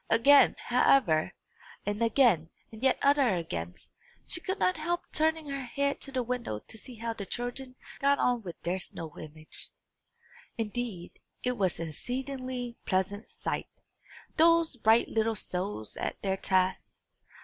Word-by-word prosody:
Again, 275 +6 +6
however, 240 -10 +3 0.5
and 205 +2 -2
again, 225 - +4 0.2
and 220 0 -11
yet 265 -1 +3
other 275 -7 +4
agains, 85 - -5 0.4
she 335 - -3
could 380 +3 -2
not 365 -1 +2
help 345 +3 -1
turning 315 0 +2
her 275 0 -3
head 280 +3 -1
to 275 - -5
the 255 -2 0
window 240 - -3
to 105 - -10
see 245 +3 -9
how 230 +1 -3
the 210 - -6
children 245 +4 -5 0.2
got 280 +1 +4
on 245 -1 +2
with 175 -5 -8
their 180 +3 -1
snow 165 -4 -6
image. 155 0 -7 0.9
Indeed, 220 -5 -4 0.2
it 250 0 0
was 190 -6 0
an 165 -1 -3
exceedingly 255 - -4
pleasant 195 +3 -1
sight, - - -4 0.7
those 330 -2 +5
bright 225 0 +4
little 225 0 +1
souls 180 - -3
at - - -3
their 195 -1 0
task! 185 -1 0
235 Hz, 150 wpm, -30 LUFS, 190-270 Hz, 0.9 s, Again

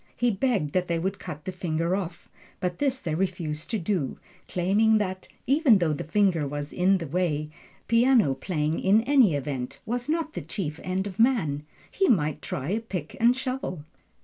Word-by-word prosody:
He 245 -1 +2
begged 200 - 0
that 180 -1 +1
they 170 - 0
would 190 +4 -2
cut 150 0 -8
the 185 - -2
finger 170 -1 -1
off, 185 -3 -5 0.3
but 180 -2 -2
this 270 -2 +1
they 165 -9 -3
refused 160 -3 -2
to 225 - 0
do, 175 -7 -1 0.3
claiming 205 +5 +3
that, 185 -3 -3 0.2
even 275 -3 +5
though 170 -4 +1
the 145 - -4
finger 170 -2 +2
was 145 +1 -5
in 190 +2 +3
the 170 - -5
way, 155 -1 -1 0.4
piano 230 - +4
playing 150 +2 -1
in 205 +4 +4
any 250 - +4
event 135 -3 -4
was 245 +4 -3
not 315 -1 -1
the - - -4
chief 160 0 -4
end 185 +1 -1
of 200 0 -7
man 160 - +2 0.2
he 385 - +2
might 155 - +2
try 135 +3 -4
a 210 +4 +1
pick 185 -9 -6
and 240 +2 +4
shovel. 255 - -3
185 Hz, 185 wpm, -26 LUFS, 155-225 Hz, 0.4 s, even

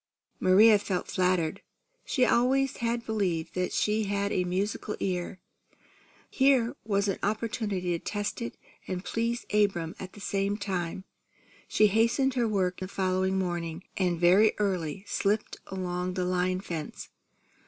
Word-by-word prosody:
Maria 205 +3 +6
felt 195 -3 -2
flattered. 180 -4 +1 0.4
She 255 -3 +2
always 265 +3 +2
had 235 0 -1
believed 185 -7 -1
that 180 0 -1
she 215 +1 +1
had 200 0 -1
a 180 - +1
musical 195 +4 -2
ear. 180 0 -2 0.9
Here 265 -3 +3
was 200 -1 +1
an 195 - -1
opportunity 210 -3 -1
to 170 - -2
test 205 +2 -3
it 235 - -5 0.3
and 185 0 -4
please 230 +1 -1
Abram 195 -6 +2
at 185 -1 -8
the - - -12
same 200 0 -1
time. 190 -3 -3 0.6
She 215 - +4
hastened 230 +6 +3
her 245 -2 +1
work 185 -4 0
the 185 - -4
following 190 0 0
morning, 175 -2 -3
and 180 -3 0
very 185 +5 +5
early 190 -4 -1
slipped 210 +2 0
along 180 -1 -3
the 185 - 0
line 185 +1 0
fence. 165 -6 -6
195 Hz, 145 wpm, -28 LUFS, 180-215 Hz, 0.9 s, Maria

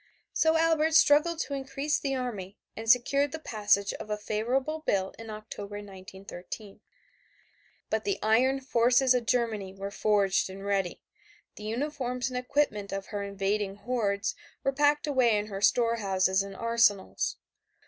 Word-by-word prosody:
So 320 0 +3
Albert 320 -1 +2
struggled 305 +3 +5
to 280 - -4
increase 275 +2 -1
the 275 -1 -2
army 210 -7 -5 0.2
and 225 0 -5
secured 275 +4 +4
the 320 - -4
passage 205 -8 +1
of - - -8
a 210 - -1
favorable 250 +9 -1
bill 190 -10 -1
in 225 0 -9
October, 215 -1 -7
1913. 195 0 -9 1.1
But - - 0
the 400 -1 -1
iron 255 +5 +3
forces 250 +1 +3
of 245 -2 -1
Germany 215 -6 0
were 195 +1 -5
forged 200 -2 +2
and 195 +1 -9
ready; 195 -3 -1 0.5
the 210 - -9
uniforms 250 +1 -2
and 250 - -4
equipment 250 -6 0
of 195 0 -4
her 205 - -2
invading 200 0 -2
hordes 205 -3 -1 0.3
were 275 - +1
packed 290 +2 +2
away 255 -7 +3
in 205 - -1
her 195 -1 -5
storehouses 200 -5 +2
and 195 0 -7
arsenals. 220 - +1
225 Hz, 150 wpm, -28 LUFS, 200-270 Hz, 1.1 s, struggled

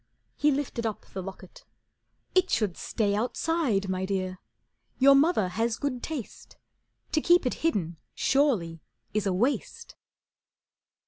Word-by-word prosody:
He 300 - +3
lifted 270 -5 -1
up 215 - -5
the 190 - -6
locket. 195 - -10 0.7
"It 370 0 +3
should 205 -6 +1
stay 205 -3 -1
Outside, 240 -1 0
my 185 0 -2
Dear. 185 -1 -2 0.6
Your 275 +1 +7
mother 275 - +3
has 225 +5 -1
good 265 -4 -2
taste. 295 -9 -7 0.5
To 310 - +2
keep 350 -2 +4
it 250 - +1
hidden 180 - 0 0.2
surely 215 - +1 0.3
is 210 -1 0
a 190 - +1
waste." 240 +10 -2
230 Hz, 130 wpm, -27 LUFS, 190-285 Hz, 0.7 s, Your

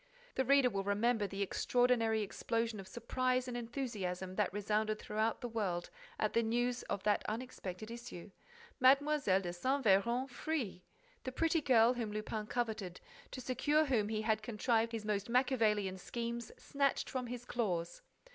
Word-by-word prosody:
The 265 - +1
reader 270 -1 +4
will 195 -1 -1
remember 210 +2 +1
the 195 +1 -2
extraordinary 230 0 +2
explosion 230 +2 -2
of 190 - -8
surprise 255 +4 0
and 250 - -4
enthusiasm 215 -7 -3
that 210 +1 +1
resounded 215 +2 0
throughout 215 +1 -1
the 245 - -3
world 195 -7 -2 0.3
at 215 - 0
the 230 - +4
news 240 +2 0
of 195 - -2
that 210 -1 +2
unexpected 215 -3 -5
issue: 235 -6 -8 0.5
Mlle. 260 +1 +8 0.2
de 190 -7 +1
Saint 260 +9 0
Véran 235 +6 +3
free! 260 - -3 0.4
The 260 - -3
pretty 325 +4 +1
girl 240 -3 +5
whom 230 -4 -3
Lupin 215 0 -4
coveted, 220 -7 -2 0.3
to 255 - -7
secure 290 +5 +2
whom 225 -7 +1
he 215 -1 -1
had 220 -1 +1
contrived 225 +1 +1
his 225 -2 -4
most 205 0 -1
Machiavellian 220 -7 +2
schemes, 235 +3 -4
snatched 280 -1 0
from 255 -2 -3
his 245 0 -6
claws! 180 -9 -2
225 Hz, 155 wpm, -35 LUFS, 205-250 Hz, 0.5 s, Mlle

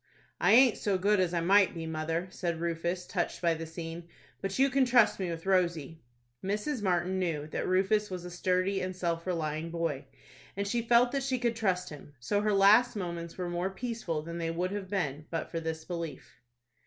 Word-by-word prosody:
"I - - +4
aint 250 -1 +6
so 200 -2 +1
good 200 +2 +2
as 180 -2 +2
I 170 -1 0
might 195 +2 +4
be, 165 -1 -5
mother," 160 +2 -2
said 170 -3 -3
Rufus, 170 +2 -2
touched 175 -2 -2
by 170 -1 +2
the 165 0 -5
scene; 165 +1 -7 0.3
"but 195 0 -3
you 270 +1 +4
can 275 +1 +4
trust 245 -5 +4
me 185 -2 -2
with 165 +1 -5
Rosie." 170 -5 0 0.4
Mrs. 210 +7 -2
Martin 185 -1 0
knew 165 -5 -1
that - - -3
Rufus 195 +3 +2
was 180 -2 -6
a 180 - -7
sturdy 185 +2 0
and 185 0 -3
self 170 -1 -2
relying 160 -2 -2
boy, 165 -4 -2 0.5
and 200 0 -1
she 235 +3 0
felt 240 +1 +4
that 275 - -1
she 265 -1 0
could 235 -1 0
trust 185 -5 0
him. 145 -1 -12
So 205 +12 0
her 210 0 +1
last 210 +5 +5
moments 170 -3 -5
were 180 -1 -3
more 175 +2 -1
peaceful 195 -7 -4
than 170 +1 -6
they 165 -1 -1
would 175 +3 -2
have 200 -2 -5
been 155 -6 -2
but 165 -1 -4
for 165 - -2
this 160 -1 -4
belief. 170 -3 -7
180 Hz, 205 wpm, -30 LUFS, 165-200 Hz, 0.5 s, aint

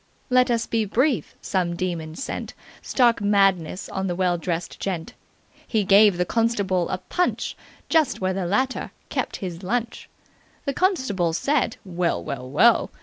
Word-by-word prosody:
Let 250 0 +4
us 230 -1 +1
be 225 -1 0
brief. 250 +6 0
Some 180 -3 0
demon 170 -3 -3
sent 270 - -5 0.3
stark 240 -4 +2
madness 195 -3 +2
on 190 0 -3
the 175 - -2
well 180 -1 +1
dressed 170 0 -4
gent. 175 -4 -4 0.5
He 220 -3 +1
gave 200 0 +6
the 180 - +1
constable 200 -5 0
a - - -1
punch 360 - -1 0.3
just 315 -4 +2
where 185 0 0
the 185 -2 -2
latter 255 +8 0 0.2
kept - - -2
his 175 -1 -6
lunch. 230 +4 -3 0.6
The 280 - -1
constable 260 - +1
said 275 - 0
'Well! 175 - -1
Well! 125 +8 -5
Well!' 225 - +4
195 Hz, 150 wpm, -24 LUFS, 175-235 Hz, 0.6 s, gave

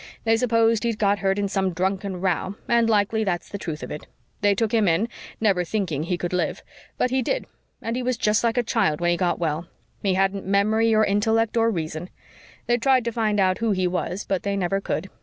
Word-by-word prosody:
They 225 0 +3
supposed 230 -1 +2
he'd 230 -2 0
got 205 -1 +2
hurt 195 0 +1
in 205 0 0
some 190 -2 0
drunken 190 +1 -2
row, 190 +1 -1
and 235 -1 +3
likely 220 +1 +2
that's 175 -4 -2
the 200 - -6
truth 160 -4 -5
of - - -6
it. 150 - -7 0.3
They 205 -1 +3
took 220 +1 0
him 220 -3 +3
in, 175 +7 +2 0.3
never 195 -5 +2
thinking 175 -6 -2
he 175 +2 -1
could 175 +1 -4
live. 180 - -1 0.3
But 250 - +1
he 260 0 +2
did - - -1 0.4
and 230 +1 -2
he 255 - -1
was 250 -1 -1
just 215 0 +2
like 230 +1 +1
a 245 - +3
child 155 -8 +1
when 175 0 +2
he - - +2
got 175 -2 +1
well. 165 0 -2 0.3
He 195 -2 +1
hadn't 195 +1 +1
memory 215 +3 +3
or 215 0 +4
intellect 220 +3 +1
or 230 0 +3
reason. 160 -3 -4 0.6
They 240 0 +2
tried 255 0 +3
to 235 - 0
find 215 -2 0
out 185 -1 +2
who 230 -2 +1
he 185 -1 0
was 180 +2 -2
but 195 -2 -1
they 200 0 -2
never 195 +1 0
could. 190 0 -3
200 Hz, 230 wpm, -24 LUFS, 185-225 Hz, 0.6 s, or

